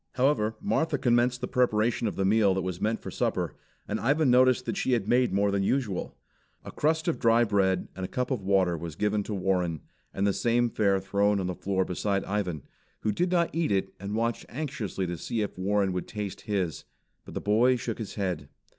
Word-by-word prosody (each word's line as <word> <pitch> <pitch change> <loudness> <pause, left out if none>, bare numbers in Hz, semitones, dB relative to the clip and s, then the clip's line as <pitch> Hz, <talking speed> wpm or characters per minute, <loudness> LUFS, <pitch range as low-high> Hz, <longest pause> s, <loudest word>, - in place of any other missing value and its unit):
However, 125 -5 +1
Martha 165 -7 +1
commenced 125 0 +2
the 125 - -2
preparation 120 -2 +1
of 105 - -3
the 95 - 0
meal 100 -1 +4
that 95 - -1
was 90 -2 -4
meant 110 +1 -1
for - - -6
supper, - - -1 0.3
and - - -2
Ivan 140 +2 +2
noticed 130 0 +4
that - - -2
she 195 -10 0
had 110 -4 0
made 125 +1 +3
more 100 +1 +2
than 100 0 +1
usual. 105 -2 -1 0.5
A - - -7
crust 160 +2 0
of 170 - 0
dry 115 +1 +4
bread 95 -4 +1
and 95 - -5
a - - -2
cup 125 +5 -2
of 125 -6 -1
water 95 -2 +2
was 85 -1 -6
given 105 +3 0
to 105 +1 -4
Warren, 90 -4 0 0.3
and 100 - -1
the 100 - +2
same 120 +2 +1
fare 100 -3 +2
thrown 100 +1 +1
on 95 - -2
the 90 - -2
floor 95 +1 -1
beside 100 +2 -1
Ivan, 95 -7 -2 0.4
who 110 - +1
did 175 - 0
not 170 -2 +2
eat 165 -5 0
it 95 -1 0
and 100 +2 -4
watched 115 +1 -1
anxiously 115 -9 -3
to 85 -2 -4
see 115 - -2
if 105 - -3
Warren 95 0 +1
would 90 - -3
taste 105 -2 -5
his. 95 -6 -2 0.4
But - - -11
the - - -1
boy 115 +5 +4
shook 115 -2 -4
his 110 - -6
head. 90 -8 -3
105 Hz, 215 wpm, -28 LUFS, 95-125 Hz, 0.5 s, meal